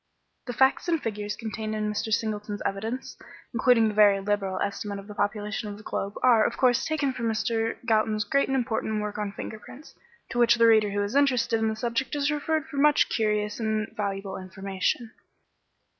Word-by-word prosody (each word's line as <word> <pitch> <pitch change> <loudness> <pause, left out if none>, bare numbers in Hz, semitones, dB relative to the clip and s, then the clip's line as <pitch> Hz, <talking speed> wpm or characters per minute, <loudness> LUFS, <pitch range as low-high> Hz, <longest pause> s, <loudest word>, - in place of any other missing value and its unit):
The 245 - -3
facts 265 +7 +3
and 335 -2 +2
figures 210 -4 -4
contained 220 0 -4
in 215 0 -1
Mr. 220 +1 -3
Singleton's 210 -1 -2
evidence, 220 +6 -3 0.4
including 230 -1 +4
the 215 - -2
very 205 -2 +5
liberal 195 -2 -1
estimate 200 0 -3
of 200 - -9
the 210 - -9
population 210 +1 -2
of 205 - -7
the 210 - -13
globe, 200 0 -4
are, 235 -4 +6
of - - -1
course, 255 -1 +3
taken 290 -4 0
from 235 -2 -3
Mr. 225 0 -1
Galton's 215 -2 +2
great 275 +7 +1
and 270 - 0
important 220 -3 -1
work 210 0 -4
on 205 -1 -2
finger 220 - -7
prints; 270 +7 -13 0.4
to 240 - -2
which 235 0 +5
the 230 -1 +4
reader 220 -2 +5
who 205 0 -1
is 205 +3 -4
interested 250 -5 +3
in 220 - +1
the 220 - -1
subject 235 +5 -2
is 290 0 +1
referred 305 +1 -1
for 280 - -9
much 295 +1 +4
curious 210 -1 0
and 220 -1 -2
valuable 195 -2 -3
information. 195 +4 -3
220 Hz, 195 wpm, -26 LUFS, 205-240 Hz, 0.4 s, are